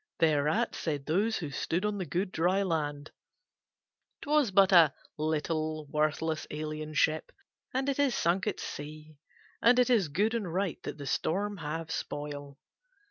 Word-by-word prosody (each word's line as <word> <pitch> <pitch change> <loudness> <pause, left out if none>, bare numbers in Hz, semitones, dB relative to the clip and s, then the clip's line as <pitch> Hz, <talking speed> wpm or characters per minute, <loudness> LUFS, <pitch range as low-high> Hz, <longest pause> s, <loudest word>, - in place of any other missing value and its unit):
Thereat 155 +8 +2
said 145 -4 -3
those 205 +8 +1
who 155 -5 -5
stood 175 +7 -1
on 210 -1 -1
the 185 - -3
good 185 +6 -1
dry 185 +4 +2
land: 150 -4 -2 1.1
"'Twas 295 -4 +3
but 195 0 +5
a 165 -6 +7 0.2
little, 155 0 -1
worthless 155 +1 0
alien 155 0 -5
ship 155 +2 +1 0.4
and 265 +2 -1
it 280 0 0
is 280 -4 +3
sunk 180 +4 +1
at 210 - -1
sea, 150 0 -8 0.4
and 240 +1 +6
it 250 0 +4
is 215 -8 +4
good 200 +10 +1
and 210 -7 -2
right 185 0 -1
that - - -6
the 145 - -7
storm 200 +9 -1
have 160 0 -4
spoil." 145 -1 -5
160 Hz, 155 wpm, -30 LUFS, 150-200 Hz, 1.1 s, a